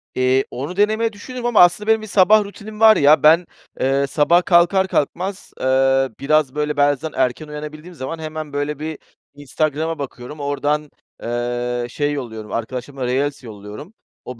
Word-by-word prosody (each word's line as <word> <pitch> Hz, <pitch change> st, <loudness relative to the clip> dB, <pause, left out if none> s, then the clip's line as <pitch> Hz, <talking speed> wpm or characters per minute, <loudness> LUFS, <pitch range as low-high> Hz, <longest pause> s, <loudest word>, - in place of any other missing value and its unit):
Eee, 130 Hz, +1 st, +2 dB
onu 145 Hz, +8 st, -5 dB
denemeyi 220 Hz, +2 st, +1 dB
düşünürüm 245 Hz, +4 st, -8 dB
ama 240 Hz, -3 st, +3 dB
aslında 175 Hz, +4 st, +4 dB
benim 220 Hz, 0 st, +3 dB
bir 215 Hz, -, -8 dB
sabah 210 Hz, +2 st, +5 dB
rutinim 210 Hz, +2 st, -10 dB
var 220 Hz, -1 st, +7 dB
ya. 145 Hz, +1 st, +5 dB
Ben, 165 Hz, +3 st, +6 dB, 0.3 s
eee, 135 Hz, +1 st, +1 dB
sabah 170 Hz, +5 st, +3 dB
kalkar 180 Hz, +2 st, +4 dB
kalkmaz, 185 Hz, +4 st, -3 dB
eee, 135 Hz, 0 st, +2 dB
biraz 145 Hz, -1 st, +1 dB
böyle, 150 Hz, 0 st, -2 dB
bazen 145 Hz, +2 st, +1 dB
erken 130 Hz, +4 st, -1 dB
uyanabildiğim 150 Hz, +3 st, -8 dB
zaman 155 Hz, +3 st, -6 dB
hemen 155 Hz, -2 st, -6 dB
böyle, 145 Hz, 0 st, -3 dB
bir 155 Hz, 0 st, -5 dB, 0.3 s
Instagram'a 155 Hz, +2 st, -2 dB
bakıyorum, 140 Hz, +1 st, -7 dB
oradan, 145 Hz, +1 st, -1 dB, 0.3 s
eee, 120 Hz, +1 st, -2 dB
şey 145 Hz, +3 st, -1 dB
yolluyorum, 110 Hz, -6 st, -6 dB
arkadaşlarıma 125 Hz, +3 st, -4 dB
reels 135 Hz, +3 st, -1 dB
yolluyorum. 105 Hz, -, -10 dB, 0.3 s
O 125 Hz, -2 st, -8 dB
150 Hz, 155 wpm, -20 LUFS, 130-175 Hz, 0.3 s, var